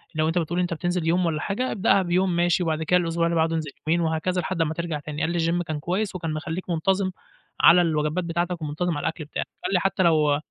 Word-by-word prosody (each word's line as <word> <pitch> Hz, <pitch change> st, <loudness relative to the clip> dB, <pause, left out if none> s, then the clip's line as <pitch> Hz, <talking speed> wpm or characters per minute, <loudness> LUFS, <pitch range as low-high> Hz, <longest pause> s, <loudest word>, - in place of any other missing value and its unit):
لو 155 Hz, 0 st, +1 dB
أنت 165 Hz, +2 st, 0 dB
بتقول 175 Hz, +1 st, 0 dB
أنت 175 Hz, -1 st, 0 dB
بتنزل 175 Hz, 0 st, -2 dB
يوم 175 Hz, +2 st, +2 dB
والّا 160 Hz, -2 st, -1 dB
حاجة 250 Hz, +6 st, -2 dB
ابدأها 200 Hz, -1 st, +3 dB
بيوم 180 Hz, 0 st, +1 dB
ماشي، 175 Hz, +1 st, +2 dB
وبعد 160 Hz, -1 st, -1 dB
كده 180 Hz, +3 st, +3 dB
الأسبوع 170 Hz, -1 st, 0 dB
اللي 170 Hz, 0 st, 0 dB
بعده 165 Hz, 0 st, +2 dB
انزل 155 Hz, -3 st, -3 dB, 0.2 s
يومين 170 Hz, +2 st, +2 dB
وهكذا 165 Hz, +3 st, 0 dB
لحد 175 Hz, 0 st, -2 dB
أمّا 160 Hz, -1 st, 0 dB
ترجع 170 Hz, -2 st, -3 dB
تاني"، 150 Hz, +1 st, -6 dB
قال 165 Hz, -, 0 dB
لي: 175 Hz, -, -1 dB
"الgym 170 Hz, +2 st, +1 dB
كان 155 Hz, -2 st, -4 dB
كويس 190 Hz, +6 st, -2 dB
وكان 165 Hz, -3 st, -3 dB
مخلّيك 160 Hz, +4 st, -5 dB
منتظم 185 Hz, +3 st, +1 dB, 0.5 s
على 175 Hz, +1 st, +8 dB
الوجبات 155 Hz, +1 st, 0 dB
بتاعتك 175 Hz, +1 st, -2 dB
ومنتظم 155 Hz, +2 st, -2 dB
على -, -, -4 dB
الأكْل 160 Hz, -1 st, -3 dB
بتاعك"، 150 Hz, -, -4 dB, 0.2 s
قال -, -, -1 dB
لي: 180 Hz, -, +4 dB
"حتى 190 Hz, +1 st, +1 dB
لو" 155 Hz, -4 st, +3 dB
170 Hz, 240 wpm, -24 LUFS, 160-180 Hz, 0.5 s, على